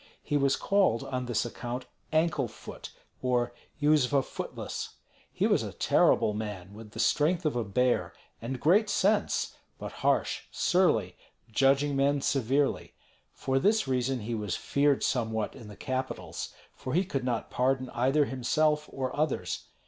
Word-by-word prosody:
He 145 - -2
was 140 -1 +3
called 195 - +2
on 125 -1 -3
this 120 -1 0
account 120 +2 -5 0.3
Ankle 155 -4 +2
foot, 110 - -10 0.3
or 125 -1 +1 0.3
Yuzva 145 -2 +3
Footless. - - -6 0.4
He - - 0
was - - +3
a - - -5
terrible 105 - +3
man, 105 -3 -5
with 105 0 -11
the - - -8
strength 165 +3 +2
of 150 - +1
a 120 - 0
bear, 125 +4 +1 0.3
and 125 +3 -4
great 200 - +4
sense, 205 +2 +1 0.2
but - - -6
harsh, - - +1
surly, 185 0 +2 0.3
judging 135 +4 +3
men 140 +1 +2
severely. 135 +1 0 0.4
For 135 0 -1
this 215 +3 +2
reason 130 -1 0
he 115 +3 -4
was 105 -4 -2
feared 140 -1 +1
somewhat 110 -3 0
in 110 - -11
the 105 - -10
capitals, 130 -10 -4 0.2
for 130 - -5
he 185 +2 +3
could 135 -7 -2
not 120 -3 -2
pardon 130 0 0
either 135 +5 +2
himself 150 +4 +1
or 130 -1 -3
others. 130 - -1
130 Hz, 150 wpm, -29 LUFS, 120-145 Hz, 0.4 s, great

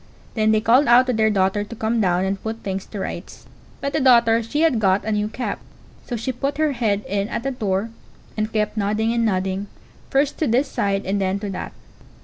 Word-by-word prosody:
Then 215 -1 +2
they 215 0 +3
called 245 +6 +4
out 245 +2 +6
to 255 - 0
their 220 -1 +3
daughter 195 0 +1
to 220 +3 -9
come 225 +1 0
down 180 -1 +2
and 195 0 -2
put 225 +1 -5
things 190 -1 -4
to 205 - -7
rights; - - -6 0.4
but 280 0 -2
the - - +1
daughter 235 -4 +5
she 235 +7 -2
had 315 -8 +3
got 195 -1 +2
a 220 - -1
new 210 0 0
cap; 245 +4 -4 0.5
so 245 - -3
she 235 +3 -2
put 275 +3 -3
her 310 -1 +2
head 215 -5 -1
in 200 +1 -1
at - - -3
the 270 - -1
door, 210 -3 -2 0.4
and 215 0 -2
kept 215 -1 -1
nodding 215 +2 0
and 235 -1 +1
nodding, 190 -1 -1 0.4
first 275 +1 +1
to 310 - +1
this 255 +5 +2
side 200 -4 -1
and 200 +1 -1
then 190 0 0
to 205 -2 -4
that. 185 - -6
220 Hz, 225 wpm, -22 LUFS, 200-240 Hz, 0.5 s, out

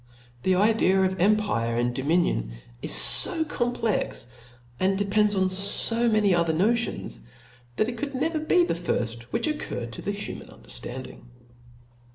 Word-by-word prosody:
The 185 +5 +2
idea 200 -1 +3
of 190 0 0
empire 185 - +1
and; 120 +1 0
dominion 135 - 0 0.3
is - - +3 0.3
fo 320 - -1
complex, 240 - -2 0.5
and 190 +1 +1
depends 205 +1 +1
on 190 -1 +1
fo 205 +5 +1
many 210 -3 +3
other 170 -2 +1
notions, 225 - -1 0.6
that 215 - +1
it 240 -1 -5
could 285 -1 -4
never 315 +4 -1
be 345 +3 +3
the - - 0
firft 120 -9 -3
which - - -2
occurred 210 - -4
to - - -7
the - - -4
human 200 0 -5
underftanding. 120 - -9
195 Hz, 145 wpm, -25 LUFS, -, 0.6 s, idea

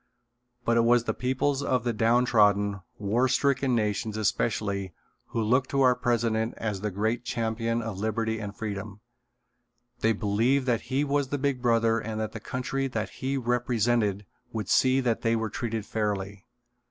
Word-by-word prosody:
But 115 0 +3
it 115 - +4
was 120 0 +4
the - - -1
peoples 130 +2 0
of 130 -4 0
the 120 -1 0
downtrodden, 105 -3 +3 0.2
war 110 +5 +1
stricken 135 0 +2
nations 105 -1 -1
especially 100 -4 -1 0.3
who 115 - -2
looked 125 +4 +2
to 140 - +1
our 130 -1 +6
president 115 -2 0
as 105 -4 -3
the 105 - -1
great 110 +5 -1
champion 115 0 -1
of 105 -3 -5
liberty 110 +1 -1
and 105 -1 -6
freedom. 105 -1 -5 1.0
They 115 -1 +3
believed 115 +6 +1
that 120 -3 +1
he 135 +2 +1
was 140 -1 0
the 145 - -2
"Big 135 -2 -1
Brother" 115 -1 +3
and 110 0 -4
that 110 -1 -2
the 115 - -7
country 130 +4 -2
that 110 -4 -3
he 135 +1 0
represented 120 -4 +1 0.3
would 110 -5 -4
see 130 +1 +4
that 120 -3 0
they 115 0 +2
were 110 -2 -2
treated 115 -2 -3
fairly. 100 -2 -3
115 Hz, 165 wpm, -27 LUFS, 105-125 Hz, 1.0 s, our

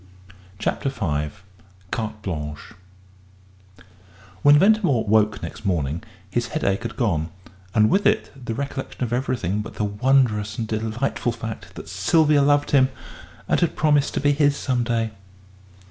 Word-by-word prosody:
CHAPTER 120 +6 -1
V 75 - -2 0.6
CARTE 110 -2 -3
BLANCHE 75 +1 -5 1.7
When 145 +5 +7
Ventimore 190 - +3
woke 105 0 +2
next - - -7
morning 85 -5 -1 0.3
his 120 +5 -1
headache 100 -11 -1
had 115 -2 -5
gone, 85 - 0 0.5
and 105 -1 +5
with 195 - +3
it 215 +1 +1
the 120 -4 -5
recollection 140 -1 -4
of 120 -1 -2
everything 120 -6 -1
but 105 - -9
the - - -2
wondrous 105 -1 +2
and 115 - -2
delightful 110 +3 -1
fact 110 -1 -7
that - - -9
Sylvia 155 -3 +3
loved 145 +1 +3
him 130 -2 +5 0.6
and - - +2
had 170 - +1
promised 150 -2 +2
to - - +1
be 145 +1 +3
his 145 0 +2
some 125 -2 0
day. 115 -2 -1
115 Hz, 145 wpm, -23 LUFS, 105-140 Hz, 1.7 s, When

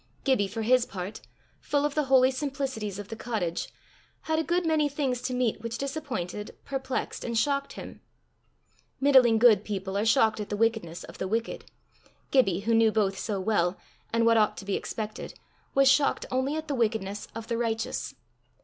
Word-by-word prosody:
Gibbie, 260 -8 +2
for 220 +3 -4
his 250 +2 +3
part, 190 +2 -6 0.4
full 290 0 0
of 295 - -1
the 300 -1 +1
holy 260 -1 +5
simplicities 265 -7 -3
of 205 -1 -8
the 225 - -5
cottage, 215 -7 -3 0.5
had 315 0 0
a - - +1
good 345 +2 0
many 310 -2 +2
things 270 -4 -1
to 255 - -3
meet 250 -4 0
which 230 0 -4
disappointed, 265 - -4
perplexed, 265 -1 -3
and 235 -1 -2
shocked 280 +3 0
him. - - -9 1.0
Middling 260 -5 +6
good 220 -3 +6
people 195 -2 -4
are 200 - +1
shocked 220 0 +3
at 210 - -5
the 205 - -2
wickedness 220 -7 0
of - - -12
the 190 - -2
wicked; 225 +3 -2 0.7
Gibbie, 195 -9 +3
who 230 +3 0
knew 225 -1 +5
both 200 -3 0
so 205 -3 -2
well, 185 -2 +1 0.3
and 230 0 +2
what 230 0 +5
ought 215 -1 +2
to 195 - -8
be 200 - -1
expected, 215 -1 -5 0.4
was 275 0 +5
shocked 270 +1 +3
only 260 +3 0
at 315 0 -4
the 290 - -2
wickedness 215 -4 -1
of 225 -1 -6
the 230 0 -1
righteous. 225 -1 -2
230 Hz, 185 wpm, -28 LUFS, 210-270 Hz, 1.0 s, Middling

